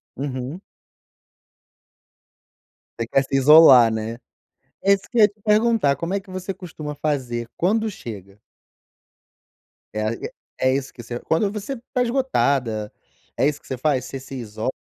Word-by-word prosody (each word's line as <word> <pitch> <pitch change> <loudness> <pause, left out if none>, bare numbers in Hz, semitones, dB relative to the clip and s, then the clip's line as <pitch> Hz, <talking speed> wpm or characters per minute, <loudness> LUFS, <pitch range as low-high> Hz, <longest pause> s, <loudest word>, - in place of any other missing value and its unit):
Uhum. 135 +4 -5 2.4
Você 115 - -2
quer 135 - +2
se 135 - -3
isolar, 135 -4 +8
né. 110 +1 -4 0.7
É 200 - +5
isso 195 - +1
que 240 - -1
ia 210 -1 +7
te 210 +1 -26
perguntar, 215 -7 +3
como 170 +5 -4
é - - +2
que 195 - -24
você 185 +1 -4
costuma 155 -5 -7
fazer 125 -6 -2
quando 220 +5 +1
chega? 105 - -9 1.5
É 110 - -2
a 110 - +1 0.5
é 130 0 +3
isso 135 0 -2
que 120 - -11
você 120 +1 -5
quando 195 - 0
você 210 +6 -5 0.2
tá 250 - +1
esgotada 140 - 0 0.5
é 135 - +3
isso 150 -1 -2
que - - -20
você 130 - -4
faz, 130 -2 0
você 135 - -6
se 135 +1 -10
iso 110 0 -6
140 Hz, 155 wpm, -22 LUFS, 120-195 Hz, 2.4 s, isolar